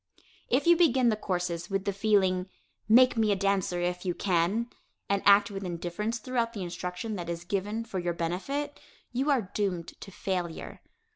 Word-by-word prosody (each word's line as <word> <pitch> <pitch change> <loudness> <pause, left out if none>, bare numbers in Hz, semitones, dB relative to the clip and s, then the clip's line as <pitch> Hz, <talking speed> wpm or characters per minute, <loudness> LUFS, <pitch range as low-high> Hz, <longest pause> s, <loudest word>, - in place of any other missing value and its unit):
If 265 +3 +2
you 345 0 +7
begin 265 -8 +4
the 220 - +2
courses 175 -4 -3
with 195 -1 -1
the 200 - 0
feeling, 190 -3 +2 0.4
"make 250 +3 +7
me 220 -2 +3
a - - +3
dancer 195 -2 0
if 180 0 -2
you 180 -2 -1
can," 195 +6 +1 0.4
and 200 0 +1
act 200 0 +6
with 195 0 -5
indifference 180 +6 -3
throughout 235 -2 -1
the 200 -5 -4
instruction 180 +4 -4
that 170 -1 -5
is 170 0 -4
given 205 +4 -2
for 200 -5 -4
your 175 -1 -1
benefit, 275 - -3 0.3
you 265 +4 0
are 240 -10 +1
doomed 185 -5 -1
to - - -12
failure. 180 -3 -4
195 Hz, 180 wpm, -29 LUFS, 180-230 Hz, 0.4 s, you